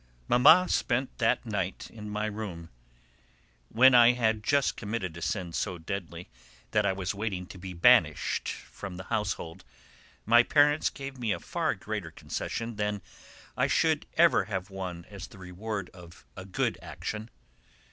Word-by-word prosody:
Mamma 150 +9 +7
spent 130 -4 0
that 115 +1 +2
night 100 -4 -3
in 105 -2 -8
my 105 +1 -2
room: 100 -6 -6 1.0
when 130 +3 +6
I 120 0 +8
had 110 -3 0
just 140 +3 +2
committed 100 -6 -4
a 85 - -8
sin 85 +1 -2
so 90 - -2
deadly 85 0 -6 0.4
that 105 -1 +2
I - - +3
was 95 0 -3
waiting 100 -3 -3
to 95 - -12
be 95 0 -7
banished 85 - +3
from 95 -3 -8
the 90 - -7
household, 95 -6 -3 0.6
my 120 +2 +7
parents 145 +4 +3
gave 135 -2 -8
me 115 -3 -1
a - - -1
far - - -1
greater - - -5
concession 115 -1 -5
than 105 -2 -2 0.5
I - - +2
should - - +1
ever - - +5
have 95 -2 -4
won 90 -3 -6
as 100 -3 -9
the - - -15
reward 95 +2 -5
of 85 -2 -14
a 95 - -8
good 95 - -1
action. 110 +1 -6
105 Hz, 155 wpm, -29 LUFS, 90-115 Hz, 1.0 s, I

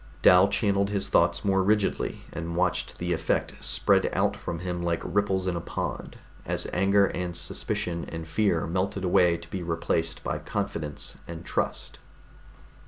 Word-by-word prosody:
Dal 90 +2 +8
channeled 100 -1 +1
his 100 -1 0
thoughts - - +3
more 95 -1 +3
rigidly, 105 +1 0
and 85 +1 -4
watched 90 0 0
the 90 0 -1
effect 80 - 0
spread - - +2
out - - +1
from 85 - -5
him 90 0 -3
like 85 -1 -1
ripples 95 -2 +1
in 90 -2 0
a 85 - -2
pond, - - -5 0.3
as - - -1
anger 100 +2 +4
and 90 -1 -3
suspicion 85 0 -2
and 80 -1 -7
fear 90 -3 +1
melted 95 +3 -1
away 90 -1 +4
to 85 0 -12
be 95 - -3
replaced 80 -1 -1
by - - -2
confidence 80 -8 -4
and 85 0 -8
trust. - - -2
90 Hz, 160 wpm, -27 LUFS, 85-100 Hz, 0.3 s, Dal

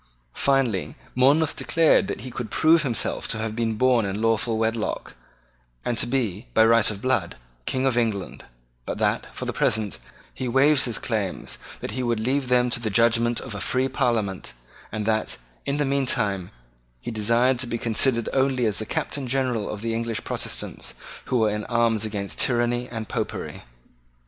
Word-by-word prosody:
Finally 135 -8 +1 0.2
Monmouth 140 +5 +4
declared 165 -1 +3
that - - -4
he 130 - -7
could 120 -2 -5
prove 160 +6 +4
himself 125 -7 -1
to - - -2
have 110 0 -3
been 115 -1 0
born 125 0 +3
in 100 +1 -2
lawful 115 0 +1
wedlock, 110 0 -1 0.7
and 120 - 0
to - - +2
be, 120 -4 -1
by 110 - +7
right 115 -1 +5
of 105 -1 -6
blood, 125 -9 +1 0.3
King 130 0 0
of 130 -3 +2
England, 110 -6 -1 0.4
but - - -3
that, - - 0
for - - -6
the - - -2
present, 110 -3 0 0.3
he 130 - -4
waived 135 +4 +4
his 120 -3 -2
claims, 105 -6 -3 0.2
that - - -4
he 130 +4 -3
would 120 -2 0
leave 130 +4 0
them 125 -1 +3
to 120 - 0
the 115 -2 -2
judgment 115 +2 +3
of 125 - -7
a 105 - -5
free 130 +3 +1
Parliament, 110 - -1 0.4
and 105 -1 -3
that, 110 0 0 0.3
in 140 - 0
the 145 - +1
meantime, 120 -9 0 0.5
he 90 - -5
desired 120 +4 +2
to 130 - 0
be 115 - -2
considered 115 +1 +2
only 130 -2 +2
as 105 -2 +1
the 110 - -4
Captain 140 -3 -2
General 125 -4 0
of 105 - -5
the 115 0 -1
English 115 -1 -2
Protestants, - - -4 0.3
who 125 - 0
were 110 -2 +3
in 105 0 -2
arms 115 -2 +2
against 105 -2 -3
tyranny 120 0 +1
and 110 -2 -5
Popery. - - -4
115 Hz, 180 wpm, -24 LUFS, 110-130 Hz, 0.7 s, by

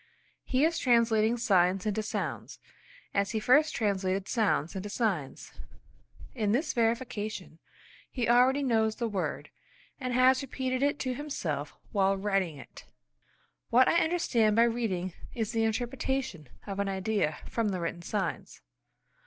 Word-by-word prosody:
He 265 +3 +2
is 330 +1 0
translating 230 -2 +3
signs 190 -4 +2
into 215 0 0
sounds, 215 - -4 0.6
as 200 0 +1
he 220 - 0
first 295 +8 +4
translated 195 -2 0
sounds 205 - 0
into 190 +2 -4
signs. 200 - -2 0.8
In 215 -4 0
this 275 +8 0
verification 225 -7 -2 0.5
he 245 -4 -2
already 255 +4 +4
knows 220 -4 +2
the 235 - -2
word 200 -4 -3 0.5
and 255 -2 -3
has 255 +2 +4
repeated 260 -1 -3
it 285 +1 +2
to 255 -1 -1
himself 170 - -4 0.2
while 195 -1 +2
writing 195 -5 -1
it. 135 - -13 0.8
What 250 +2 +5
I 340 - +4
understand 240 -11 +2
by 230 - +6
reading 215 -7 -1 0.2
is 225 -2 -2
the 225 -1 +1
interpretation 240 - -2 0.2
of 200 -1 -5
an 200 0 0
idea 195 -5 -1
from 230 -3 -1
the 185 -2 -2
written 170 0 -4
signs. 195 +3 -4
220 Hz, 140 wpm, -29 LUFS, 195-250 Hz, 0.8 s, by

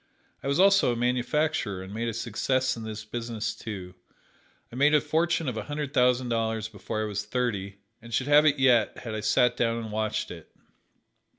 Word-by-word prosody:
I - - -5
was 140 +4 +1
also 195 -7 +5
a - - -1
manufacturer, 125 -3 0
and 95 +1 -9
made 115 +2 -2
a 115 - -2
success 130 +3 0
in 115 - -8
this 110 -1 -6
business, 115 0 -4
too. 95 -5 -7 0.8
I - - -10
made 145 +4 +4
a - - +6
fortune 160 +2 0
of 125 -3 -2
a 105 - -4
hundred 145 -1 -4
thousand 125 -2 +3
dollars 115 -1 -1
before 110 0 -4
I - - -1
was 105 -1 -3
thirty, 100 -6 -2 0.2
and 115 +1 -12
should 130 - 0
have 150 +2 +6
it 145 -1 +3
yet 125 -5 +3
had 115 -2 -6
I 110 - -2
sat 125 +3 +3
down 115 -1 0
and 110 -2 -5
watched 110 0 -2
it. 85 -3 -11
115 Hz, 200 wpm, -27 LUFS, 110-135 Hz, 0.8 s, a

